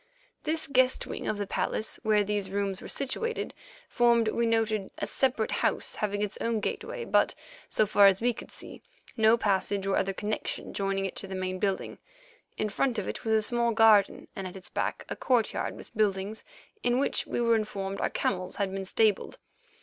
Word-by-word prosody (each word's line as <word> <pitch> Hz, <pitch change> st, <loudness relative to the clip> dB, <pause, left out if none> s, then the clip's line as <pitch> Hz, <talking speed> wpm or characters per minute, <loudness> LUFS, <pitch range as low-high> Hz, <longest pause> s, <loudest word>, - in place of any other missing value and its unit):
This 315 Hz, 0 st, 0 dB
guest 260 Hz, -1 st, +3 dB
wing -, -, -5 dB
of 215 Hz, -, 0 dB
the 205 Hz, -, -2 dB
palace, 215 Hz, +2 st, -2 dB
where 215 Hz, -1 st, +3 dB
these 205 Hz, -1 st, -2 dB
rooms 195 Hz, -1 st, -2 dB
were -, -, -8 dB
situated, 455 Hz, -, -2 dB, 0.3 s
formed, 235 Hz, -2 st, +3 dB
we 235 Hz, +1 st, +1 dB
noted, 220 Hz, -3 st, +1 dB
a -, -, -2 dB
separate 250 Hz, -5 st, 0 dB
house, -, -, 0 dB
having 205 Hz, -1 st, -1 dB
its 210 Hz, -, -4 dB
own 230 Hz, -1 st, 0 dB
gateway, 470 Hz, -, -4 dB
but, -, -, +3 dB, 0.3 s
so 215 Hz, -, +3 dB
far 200 Hz, -1 st, +6 dB
as 195 Hz, -1 st, +4 dB
we 245 Hz, +1 st, +2 dB
could -, -, -10 dB
see, -, -, -9 dB, 0.3 s
no 220 Hz, 0 st, +5 dB
passage 200 Hz, -2 st, 0 dB
or 195 Hz, -, +1 dB
other 195 Hz, -, +1 dB
connection 210 Hz, +2 st, -3 dB
joining 195 Hz, 0 st, -1 dB
it 190 Hz, -, -4 dB
to 195 Hz, -, -1 dB
the 190 Hz, -, -5 dB
main 185 Hz, 0 st, -3 dB
building. 195 Hz, -1 st, -2 dB, 0.6 s
In 215 Hz, -, 0 dB
front 235 Hz, +4 st, 0 dB
of 205 Hz, -, -2 dB
it -, -, -5 dB
was 220 Hz, -, +1 dB
a 220 Hz, -, +4 dB
small 235 Hz, +1 st, +1 dB
garden, 220 Hz, -3 st, +5 dB
and 190 Hz, -1 st, -4 dB
at 185 Hz, -, -8 dB
its 180 Hz, -1 st, -13 dB
back -, -, -2 dB
a -, -, -4 dB
courtyard 245 Hz, -4 st, 0 dB
with -, -, -13 dB
buildings, 205 Hz, 0 st, 0 dB, 0.4 s
in 245 Hz, -6 st, +2 dB
which 275 Hz, -, +1 dB
we -, -, -2 dB
were 230 Hz, -1 st, +4 dB
informed 195 Hz, -3 st, -3 dB
our -, -, +1 dB
camels 185 Hz, -1 st, -1 dB
had 200 Hz, -2 st, -1 dB
been 195 Hz, 0 st, -3 dB
stabled. 210 Hz, +1 st, +1 dB
210 Hz, 195 wpm, -29 LUFS, 195-230 Hz, 0.6 s, far